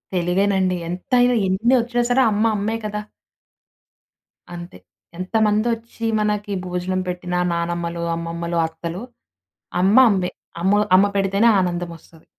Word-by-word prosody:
తెలుగేనండి. 185 +1 +1
ఎంతైనా 245 +7 +2
ఎన్నొచ్చినా 240 +5 +2
సరే 265 - +4
అమ్మ, 210 +1 +1
అమ్మే 215 +3 -1
కదా... 210 0 -3 1.5
అంతే. 175 - -9 0.4
ఎంతమందొచ్చి 225 +4 -1
మనకి 210 -1 -1
భోజనం 180 +1 -2
పెట్టిన 180 0 -4 0.2
నానమ్మలు, 170 0 -3
అమ్మమ్మలు, 170 0 -4
అత్తలు 165 +3 -7 0.8
అమ్మ 195 +5 +4
అమ్మే. 185 -2 -1 0.3
అమ్మ 205 +3 +3 0.2
అమ్మ 195 - +5
పెడితేనే 195 +3 +2
ఆనందం 175 -1 -2
ఒస్తది. 160 0 -21
190 Hz, 105 wpm, -21 LUFS, 175-215 Hz, 1.5 s, అమ్మ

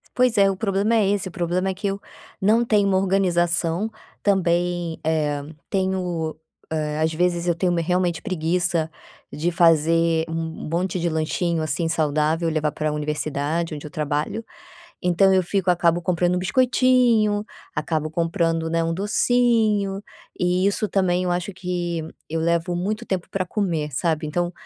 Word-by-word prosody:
Pois 250 -3 +3
é, 195 0 +6
o 195 - -1
problema 200 +2 0
é 210 -3 +3
esse 200 -2 0
o 185 - -7
problema 180 +1 -1
é 190 - -1
que 200 +2 -3
eu 195 0 -2 0.4
não 220 +4 +3
tenho 210 -4 +2
uma 190 - +3
organização 180 0 +1 0.3
também, 175 -3 +1
eh, 150 -2 0 0.3
tenho, 180 -4 -1 0.4
eh, 155 -1 -2
às 160 0 +2
vezes 175 +1 0
eu 175 - +2
tenho 180 +1 +1
me 170 -1 +1
realmente 180 0 0
preguiça 175 -3 0 0.4
de 170 +4 -1
fazer 165 -1 +3
um - - -4 0.4
monte 180 +2 -1
de 170 - 0
lanchinho, 160 +1 -1
assim, 155 +2 -1
saudável 155 +1 +1
e 165 - 0
levar 155 -1 0
para 155 +1 -2
a - - -1
universidade 150 +2 -2
onde 150 0 -7
eu - - -9
trabalho. 150 +9 -2 0.6
Então 185 +2 +4
eu 190 - +4
fico 185 +1 +1
acabo 175 0 +2
comprando 175 +1 +1
um - - 0
biscoitinho, 235 -1 +3 0.3
acabo 155 0 -2
comprando, 165 -1 0
né, 165 0 +1
um 165 0 -1
docinho 210 -1 +1 0.3
e 180 +2 +2
isso 205 +1 -1
também 185 -1 +1
eu 180 - 0
acho 180 +3 -2
que 175 -3 -3 0.2
eu 165 0 -1
levo 170 +1 0
muito 200 +5 -2
tempo 185 -2 -3
para 190 -1 -1
comer, 170 -6 -2
sabe. 160 0 0
Então 175 +3 -1
175 Hz, 165 wpm, -23 LUFS, 165-195 Hz, 0.6 s, é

